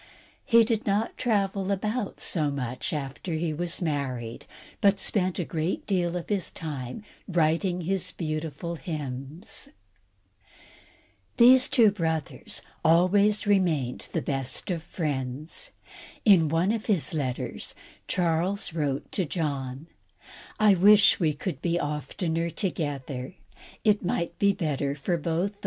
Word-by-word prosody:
He 230 -3 +6
did 225 -1 -1
not 205 +3 +1
travel 200 -4 0
about 210 +3 -2
so 155 -4 0
much 130 -3 -3
after 150 +3 -4
he 160 0 -1
was 175 +3 -2
married, 130 -7 -3 0.3
but 200 -2 +4
spent 185 -3 +1
a 175 - -1
great 160 +2 -2
deal 180 -3 0
of 175 - -6
his 200 -3 -1
time 150 - -6 0.2
writing 175 +1 +1
his 190 +2 -1
beautiful 160 +1 -4
hymns. 150 - -5 1.7
These 255 +2 +7
two 225 -5 +5
brothers 160 -6 -3 0.2
always 200 +6 +4
remained 170 -11 +1
the - - -1
best 135 +5 -2
of 170 -2 -2
friends. 150 -3 -3 0.6
In 180 -8 +6
one 165 +6 +2
of 225 -1 -3
his 195 -9 +2
letters, 135 -5 -3 0.3
Charles 180 +3 0
wrote 145 -4 -2
to 190 - 0
John: 140 -4 -3 0.7
"I 215 -2 +6
wish 205 +3 +6
we 155 -5 +1
could 175 +5 -4
be 170 0 +1
oftener 160 +3 -2
together; 145 -6 -3 0.5
it 210 -2 +3
might 170 -1 -2
be 200 0 +5
better 145 -6 -1
for 150 +5 -2
us 170 - 0
both. 170 +5 0
170 Hz, 130 wpm, -27 LUFS, 150-195 Hz, 1.7 s, These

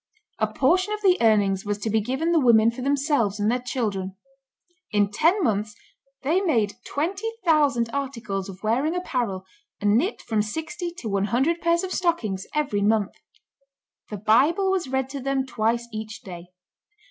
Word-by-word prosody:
A 215 - +2
portion 365 - +2
of 425 - -11
the 370 -2 +5
earnings 205 -4 +3
was 205 -1 -2
to 210 +1 -3
be 220 0 +2
given 265 +9 -1
the 335 - +4
women 230 -4 +5
for 235 - -8
themselves 275 -6 +1
and 210 +2 +2
their 250 - 0
children. 210 -7 -3 0.7
In 205 -2 +1
ten 340 - +2
months 210 -4 0 0.5
they 325 +8 +2
made 225 - +1
twenty 385 +9 -2
thousand 290 -8 +3
articles 230 -8 -3
of 190 +1 -11
wearing 260 +10 +1
apparel, 240 - -2 0.3
and 205 0 +2
knit 375 - -2
from 220 -2 0
sixty 320 - -4
to 240 - -6
one 200 -1 0
hundred 270 - +1
pairs 335 +1 +2
of 370 - -3
stockings 225 - -1
every 275 -9 0
month. 210 -1 +2 1.0
The 210 - -5
Bible 280 - +3
was 370 -5 0
read 265 0 -1
to 280 +1 -5
them 270 0 -1
twice 235 -1 -1
each 215 0 -6
day. 175 -2 -9
240 Hz, 170 wpm, -24 LUFS, 210-310 Hz, 1.0 s, the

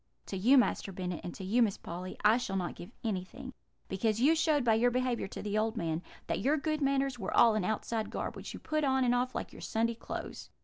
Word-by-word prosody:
To - - -5
you, 235 +9 +5
Master 240 -5 +2
Bennet, 180 -2 -4
and 175 - -4
to - - -7
you, 215 +6 +2
Miss 210 -4 +2
Polly, 180 +2 -7
I 215 +2 +7
shall 200 -6 -3
not 180 -2 -1
give 175 - -10
anything; 225 +6 -4 0.3
because 215 +3 0
you 285 +6 +5
showed, 310 -3 +2
by 225 - +5
your 235 +3 +4
behaviour 250 -3 0
to - - -7
the 210 0 0
old 220 +1 -1
man, 165 -2 -1 0.2
that - - -1
your 285 +8 +2
good 310 +1 -1
manners 275 -2 +1
were 190 - -2
all 230 - +7
an 215 -3 0
outside 220 +2 -2
garb, - - -4
which - - -7
you - - -8
put 310 0 -1
on 265 -1 +3
and 245 -1 +3
off 250 +1 0
like - - -4
your - - -11
Sunday 230 +1 0
clothes.' 230 - -7
230 Hz, 245 wpm, -31 LUFS, 195-260 Hz, 0.3 s, I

